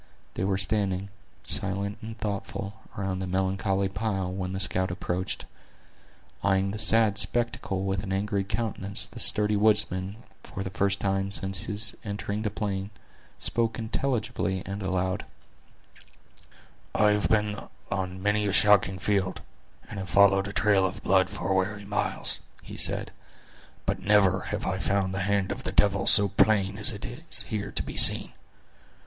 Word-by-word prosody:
They - - -3
were 95 0 0
standing, 100 -1 0 0.3
silent 100 +1 0
and 110 +1 -8
thoughtful, 100 -1 -5 0.2
around 95 -2 -3
the 95 - -4
melancholy 95 +1 0
pile, 95 -2 -3
when 95 -1 -4
the 95 - -4
scout 95 -1 +2
approached. 90 +1 -4 1.0
Eyeing 95 0 +1
the 105 - -6
sad 110 -2 +3
spectacle 120 -6 0
with 95 0 -1
an 100 -2 -6
angry 100 +1 -1
countenance, 100 -1 -2
the - - -12
sturdy 105 0 +4
woodsman, 100 -2 +1 0.3
for 95 - -7
the 95 - -6
first 100 +1 0
time 95 0 -1
since 95 -1 0
his 110 +1 -3
entering 105 -1 -4
the 110 - -1
plain, 100 -1 -4 0.5
spoke 115 -1 0
intelligibly 110 -5 -2
and 100 +1 -5
aloud: 95 -1 -2 1.7
"I 105 -1 +4
have 105 0 0
been 105 -1 0 0.3
on 95 -1 -4
many 105 0 +1
a 100 - -1
shocking 100 -2 +4
field, 95 -1 -1 0.5
and - - -7
have 95 -1 -6
followed 100 +1 +4
a - - -5
trail 100 0 +2
of 95 +1 -3
blood 95 -1 +3
for 90 +2 -3
weary 100 +2 -1
miles," 100 +1 -2 0.2
he - - -10
said, - - +2 0.7
"but - - -1
never 100 -2 +3
have - - -3
I - - -2
found 95 -1 -1
the 95 - -3
hand 100 -2 0
of - - -5
the - - -3
devil 100 -1 +2
so 100 - +6
plain 100 0 +2
as 135 - +4
it 105 -2 -6
is 155 +8 +5
here 105 -2 -4
to - - -1
be - - -8
seen! - - +8
100 Hz, 160 wpm, -26 LUFS, 95-105 Hz, 1.7 s, seen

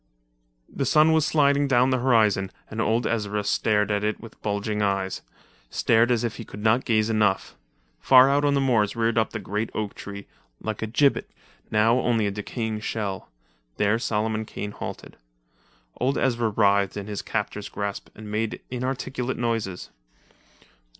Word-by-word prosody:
The 135 - -3
sun 155 +3 +5
was 160 -1 +3
sliding 140 -2 +3
down 130 0 +3
the 130 - +2
horizon 110 -6 +2 0.2
and 110 +1 -2
old 115 +1 +1
Ezra 105 -2 -1
stared 105 0 +1
at 105 0 0
it 105 0 -1
with 115 - -13
bulging 105 0 -2
eyes—stared 100 +3 -1
as 120 -1 +1
if 115 -2 -3
he 115 - -6
could 105 -1 -10
not 115 +3 +3
gaze 110 -1 +2
enough. 105 -3 +1 0.4
Far 130 0 +7
out 140 +1 +2
on 145 -1 +3
the 140 - +2
moors 115 -6 +2
geared 115 0 +1
up 110 - +1
the - - -5
great 105 +2 -3
oak 105 -2 -2
tree, 100 0 -8 0.3
like 110 -1 -4
a 110 - -2
gibbet, 140 +5 +2 0.4
now 115 +3 +3
only 115 -4 +1
a 100 - 0
decaying 110 +2 -4
shell. 105 -3 -4 0.5
There 105 +2 +2
Solomon 110 -1 -1
Kane 105 -1 -6
halted. - - -8 0.8
Old 135 +3 0
Ezra 120 -3 +1
writhed 100 -1 +2
in 100 - -4
his 105 -1 -4
captor's 105 -1 -3
grasp 100 -1 -5
and 105 -1 -9
made 110 +1 -2
inarticulate 130 0 -3
noises. 115 -6 -2
110 Hz, 165 wpm, -25 LUFS, 105-120 Hz, 0.8 s, Far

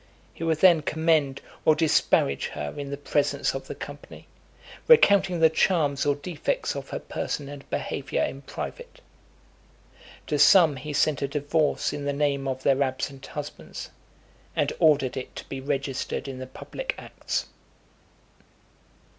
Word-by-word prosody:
He - - -7
would 160 -1 0
then 175 -4 +7
commend 155 -3 +1 0.2
or 155 - +5
disparage 155 - +2
her 75 -1 -4
in 140 -1 -5
the 140 - -4
presence 145 0 0
of - - -6
the - - -6
company, - - -10 0.6
recounting 200 - +6
the 160 0 +6
charms 150 -5 +2
or 145 - +3
defects 175 - -2
of - - -6
her - - -3
person 145 - -4
and 140 0 -10
behaviour 135 0 -2
in 135 - -4
private. 485 - -7 1.3
To 150 -2 -1
some 160 -1 +6
he 150 +4 -6
sent 145 0 +1
a 140 - 0
divorce 145 +2 0
in 145 - -5
the 145 - 0
name 140 -1 0
of 130 0 -3
their 135 0 +3
absent 135 0 -2
husbands, - - -7 0.6
and - - +1
ordered 145 -5 +4
it 130 - -6
to - - -8
be 135 -1 -6
registered 140 0 -3
in 130 -1 -6
the 130 - -6
public - - -5
acts. - - -4
145 Hz, 150 wpm, -26 LUFS, 135-160 Hz, 1.3 s, then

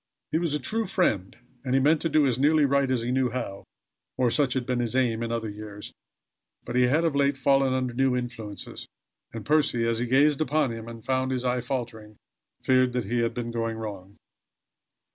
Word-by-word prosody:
He 160 - +1
was 165 -4 -1
a - - -1
true 220 - -2
friend 110 - 0 0.3
and 130 -1 0
he - - +5
meant 150 +3 +3
to 165 - 0
do 155 -2 +3
as 130 -2 +1
nearly 150 +1 +4
right 140 -1 +2
as 125 -3 0
he 120 - -2
knew 130 -1 +1
how; 110 -5 -5 0.5
or, 125 -2 +2
such 140 -2 +2
had 130 -2 -1
been 125 -1 -1
his 120 0 -1
aim 120 -3 +1
in 115 0 -3
other 115 -1 -2
years, 105 0 -8 0.7
but 120 - -5
he 125 0 +4
had 155 +6 +2
of 160 -4 0
late 140 0 +2
fallen 135 0 +3
under 130 -2 -1
new 135 +1 +2
influences, 115 -4 -5 0.4
and 115 -2 -7
Percy, 145 -6 +2
as 115 -1 +1
he 120 - -1
gazed 140 +4 +3
upon 150 -3 +1
him, 115 0 -7
and 115 -2 -10
found 130 0 0
his 130 -1 -2
eye 125 0 0
faltering, 115 -4 -5 0.5
feared 130 -1 +3
that 125 -3 -1
he 120 +4 -1
had 115 0 0
been 120 -1 -4
going 115 -1 -2
wrong. 100 -3 -8
125 Hz, 215 wpm, -26 LUFS, 115-135 Hz, 0.7 s, he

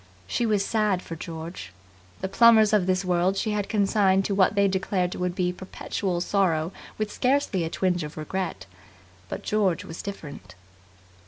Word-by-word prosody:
She 230 - -1
was 205 -2 +1
sad 210 -5 +1
for 165 - -7
George. 160 - -7 0.5
The - - -1
Plummers 220 +1 +6
of 195 -4 +3
this 185 +1 +1
world 180 +2 +1
she 215 - 0
had 205 -1 -2
consigned 200 -2 +3
to 200 - -1
what 195 +1 +3
they 200 0 +4
declared 190 -1 -1
would 180 -1 -2
be 180 -1 0
perpetual 185 -1 -3
sorrow 175 -4 +1 0.3
with 215 -1 -2
scarcely 255 -8 +1
a - - -3
twinge 180 -1 0
of 150 +1 -8
regret. 155 - -4 0.6
But - - -5
George 200 -6 +1
was 165 - -7
different. 145 - -8
190 Hz, 165 wpm, -25 LUFS, 175-205 Hz, 0.6 s, Plummers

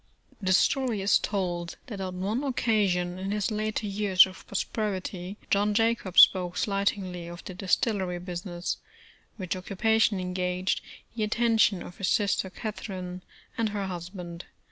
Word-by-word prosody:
The 185 -1 +1
story 235 +2 +3
is 200 - +5
told 175 -4 -2
that 205 -6 -6
on 185 -1 -4
one 215 +8 -1
occasion 200 -9 +1
in 190 +1 -3
his 210 +1 0
later 215 0 -1
years 200 -2 +5
of 190 -1 -12
prosperity, 195 -2 -3
John 205 +1 +3
Jacob 225 -4 +1
spoke 180 -1 +7
slightingly 195 -3 -1
of 175 +1 -9
the 185 - -6
distillery 185 0 0
business, 175 0 -4 0.6
which 185 -4 -3
occupation 205 +2 +2
engaged 180 0 -1 0.3
the 225 - -3
attention 220 -3 +3
of 175 - -11
his 195 - 0
sister 200 -2 +1
Catherine, 185 -3 -6 0.4
and 225 -1 +2
her 205 -1 -2
husband. 175 -1 -7
190 Hz, 140 wpm, -28 LUFS, 180-210 Hz, 0.6 s, spoke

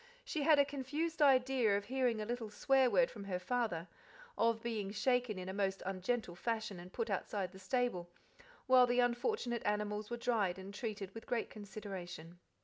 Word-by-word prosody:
She 320 -11 -2
had 300 +1 +6
a 285 - +6
confused 290 +4 -3
idea 255 -6 +4
of 200 - -5
hearing 250 -3 +1
a 215 - -2
little 235 -1 -3
"swear 265 +4 +3
word" - - +3
from 205 -2 -8
her 185 -2 -2
father, 185 -4 -1 0.5
of 230 -1 +2
being 220 -4 -2
shaken 245 0 +1
in 185 0 -5
a 190 - -3
most 195 -1 -1
ungentle 195 +2 -1
fashion 220 -1 -2
and 180 +1 -10
put 230 0 -2
outside 195 -1 -2
the 190 - -12
stable, 190 -3 -1 0.6
while 255 -1 +7
the 245 +1 +2
unfortunate 245 - +1
animals 210 0 -1
were 240 - -3
dried 215 -7 +1
and 190 +1 -8
treated 205 -3 -5
with 225 - -9
great 240 - -1
consideration. 185 -5 -8
220 Hz, 180 wpm, -36 LUFS, 195-250 Hz, 0.6 s, while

